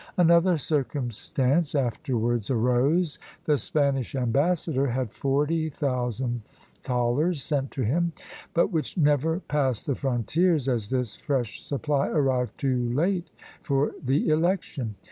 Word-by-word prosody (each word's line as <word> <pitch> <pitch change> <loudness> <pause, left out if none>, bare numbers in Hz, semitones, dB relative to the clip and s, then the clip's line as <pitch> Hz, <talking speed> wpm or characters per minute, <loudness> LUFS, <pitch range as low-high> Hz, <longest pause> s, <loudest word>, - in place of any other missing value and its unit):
Another 170 0 +5
circumstance 140 +1 0
afterwards 120 -3 0
arose; 130 +7 +2 0.3
the 150 -2 +2
Spanish 140 -6 0
ambassador 140 +3 +1
had 125 -3 -2
forty 150 +4 0
thousand 125 -4 -2
thalers 125 +9 -2
sent 140 -3 -1
to 130 - -3
him, 170 +10 +1 0.4
but 170 - +3
which 160 0 -2
never 155 +2 +2
passed 135 - -1
the 140 - 0
frontiers, 140 - +1
as 115 -6 -1
this 125 -5 -1
fresh 130 -6 -2
supply 140 0 -1
arrived 130 -5 0
too 125 -3 0
late 175 +4 0 0.3
for 140 -2 +1
the 135 +2 +1
election. 155 - 0
140 Hz, 120 wpm, -26 LUFS, 125-155 Hz, 0.4 s, Another